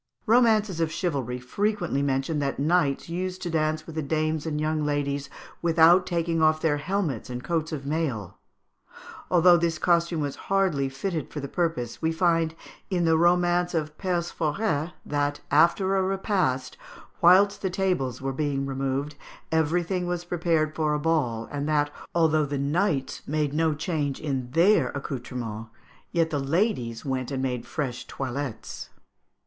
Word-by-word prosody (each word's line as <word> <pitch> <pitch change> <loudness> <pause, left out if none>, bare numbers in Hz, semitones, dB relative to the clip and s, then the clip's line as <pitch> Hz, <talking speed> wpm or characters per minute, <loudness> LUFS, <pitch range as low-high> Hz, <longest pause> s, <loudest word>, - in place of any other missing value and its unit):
Romances 220 -6 +3
of 165 -1 0
chivalry 140 - -2
frequently 175 +2 -1
mention 140 +2 0
that 140 -1 -1
knights 145 -1 +1
used 185 +2 -3
to 175 - -3
dance 155 -1 0
with 165 - -9
the 160 - -2
dames 155 +1 -1
and 150 -1 -2
young 155 0 0
ladies 145 -1 -1 0.3
without 170 +2 +5
taking 170 -2 0
off 155 0 +4
their 155 -2 +1
helmets 155 - -2
and 125 0 -5
coats 160 +3 -1
of 140 -3 -5
mail. 140 - -2 0.9
Although 175 0 +6
this 170 -1 0
costume 170 -1 +2
was 145 -2 -2
hardly 185 -9 +2
fitted 155 +3 -3
for 150 - -6
the 140 - -4
purpose, 155 -7 -2
we 160 - +1
find, 165 -1 +1 0.3
in 175 -3 +1
the 160 0 +4
romance 175 +1 +3
of 150 -2 -2
"Perceforet," 170 -2 -1
that, 145 0 -1
after 170 +6 +4
a 190 - +3
repast, 190 - 0 0.4
whilst 190 +4 +5
the 190 - 0
tables 180 -10 -1
were 135 0 -1
being 140 -1 -1
removed, 135 +2 -2 0.4
everything 175 +3 +1
was 175 0 -3
prepared 165 -3 0
for 155 -1 0
a - - -1
ball, 145 -8 0
and 145 +1 -3
that 145 -1 +2 0.2
although 155 -3 +3
the 140 0 -2
knights 145 0 0
made 150 -1 0
no 160 0 +1
change 150 -3 -2
in 135 -5 -3
their 165 -1 +4
accoutrements, 120 -5 -5 0.4
yet 165 -1 +1
the 145 - 0
ladies 135 - -1
went 130 -2 -2
and 135 -2 -2
made 125 -2 -2
fresh 130 -6 -4
toilettes. 135 -2 -5
155 Hz, 155 wpm, -26 LUFS, 140-175 Hz, 0.9 s, Although